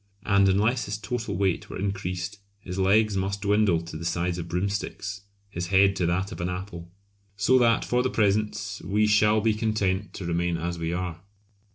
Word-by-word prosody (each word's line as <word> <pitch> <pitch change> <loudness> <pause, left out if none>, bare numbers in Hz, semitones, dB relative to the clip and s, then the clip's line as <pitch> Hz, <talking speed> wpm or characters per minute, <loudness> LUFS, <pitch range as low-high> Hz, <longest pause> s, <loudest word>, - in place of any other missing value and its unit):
And 100 -2 +4
unless 110 +6 +2
his 100 +1 -3
total 115 -3 -4
weight 95 -2 0
were - - -6
increased 95 0 -3 0.2
his 95 -1 -6
legs 105 +2 +3
must 95 +1 -2
dwindle 100 -4 +3
to 85 -1 -9
the 80 - -6
size 85 +1 -1
of 85 - -5
broomsticks, 100 +2 -3 0.3
his 85 -2 -4
head 100 +1 +4
to 90 - +1
that 95 +4 -1
of - - -6
an 85 - -1
apple! 90 -2 -6 0.5
So 125 +6 +4
that 115 -2 +3
for 125 0 +1
the 130 - 0
present 105 -2 0
we 105 +2 +2
shall 105 0 +4
be 110 0 +2
content 105 -3 -1
to 95 - -6
remain 85 0 0
as 85 +1 -3
we 80 0 -2
are! 90 -2 -4
100 Hz, 190 wpm, -26 LUFS, 90-105 Hz, 0.5 s, And